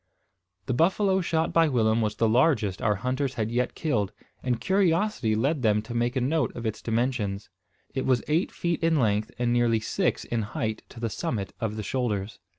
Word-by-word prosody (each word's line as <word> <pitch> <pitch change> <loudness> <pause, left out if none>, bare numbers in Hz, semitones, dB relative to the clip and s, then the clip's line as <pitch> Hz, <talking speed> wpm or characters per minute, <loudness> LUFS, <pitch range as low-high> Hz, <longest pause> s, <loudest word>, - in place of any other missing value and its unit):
The 125 - -1
buffalo 190 - +2
shot 165 -1 0
by 165 -1 +5
Willem 115 -3 +2
was 105 -1 -1
the 115 - +2
largest 115 - +2
our 105 -2 +2
hunters 130 +5 -2
had 110 0 -2
yet 125 +1 0
killed; 110 - 0 0.3
and 125 -3 -1
curiosity 190 - +1
led 140 +6 +1
them 105 -2 +2
to 115 - -7
make 120 +2 0
a 130 - +1
note 155 +5 +1
of 115 - -6
its 110 -1 -3
dimensions. 115 -4 -1 0.4
It 130 -1 -2
was 130 -2 +2
eight 160 +5 +1
feet 170 -1 -2
in 165 0 +3
length, 110 -4 +1
and 120 0 +1
nearly 120 -2 +3
six 110 - -1
in 120 -1 -1
height 110 +1 -3
to 120 - -11
the 115 -2 -2
summit 100 -1 -3
of 110 -2 -2
the 110 - -4
shoulders. 110 -5 -2
120 Hz, 195 wpm, -26 LUFS, 110-145 Hz, 0.4 s, by